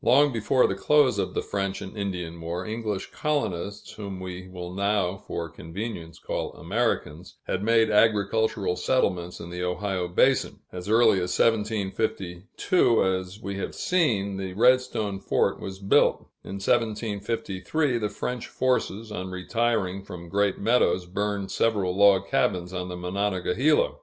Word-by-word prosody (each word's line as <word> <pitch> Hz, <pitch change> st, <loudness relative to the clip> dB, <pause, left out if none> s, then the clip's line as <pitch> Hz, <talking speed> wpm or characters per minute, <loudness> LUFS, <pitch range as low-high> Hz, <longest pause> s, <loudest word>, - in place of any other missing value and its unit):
Long 140 Hz, +3 st, +5 dB
before 120 Hz, +3 st, +3 dB
the -, -, +1 dB
close 145 Hz, +6 st, +3 dB
of -, -, -2 dB
the -, -, 0 dB
French 100 Hz, -1 st, -2 dB
and 95 Hz, -, -8 dB
Indian 90 Hz, -5 st, -4 dB
War, 85 Hz, +2 st, -4 dB
English 110 Hz, -3 st, -3 dB
colonists 105 Hz, -, -2 dB
whom 100 Hz, -3 st, -7 dB
we 95 Hz, 0 st, -7 dB
will 90 Hz, -1 st, -7 dB
now, 100 Hz, -1 st, +1 dB
for 85 Hz, -3 st, -5 dB
convenience, 85 Hz, +1 st, -7 dB
call -, -, -4 dB
Americans 115 Hz, +7 st, -2 dB
had 90 Hz, -, -2 dB
made 115 Hz, 0 st, +3 dB
agricultural 105 Hz, -2 st, +2 dB
settlements 90 Hz, -9 st, 0 dB
in 85 Hz, -, -8 dB
the 90 Hz, 0 st, -5 dB
Ohio 90 Hz, 0 st, -1 dB
basin. 130 Hz, +9 st, +2 dB
As 90 Hz, +2 st, -7 dB
early 110 Hz, -3 st, +5 dB
as 90 Hz, -, -1 dB
1752, 105 Hz, -, +1 dB
we 100 Hz, 0 st, -4 dB
have -, -, -4 dB
seen, 110 Hz, -, +1 dB
the 95 Hz, -1 st, -4 dB
Redstone 115 Hz, -3 st, +2 dB
fort -, -, +1 dB
was 95 Hz, 0 st, -6 dB
built. 100 Hz, 0 st, +3 dB, 0.2 s
In -, -, -8 dB
1753, 110 Hz, +5 st, -1 dB
the 105 Hz, -2 st, -1 dB
French 125 Hz, +3 st, -4 dB
forces, 115 Hz, -4 st, -1 dB
on 95 Hz, -2 st, -4 dB
retiring 100 Hz, 0 st, -1 dB
from 85 Hz, -3 st, -9 dB
Great 100 Hz, +1 st, +1 dB
Meadows, 100 Hz, -5 st, +2 dB
burned 100 Hz, +2 st, -2 dB
several 100 Hz, -5 st, +1 dB
log 100 Hz, -1 st, +5 dB
cabins 90 Hz, -2 st, 0 dB
on 90 Hz, 0 st, -4 dB
the 90 Hz, -, -5 dB
Monongahela. 100 Hz, -, +1 dB
100 Hz, 140 wpm, -26 LUFS, 90-115 Hz, 0.2 s, Long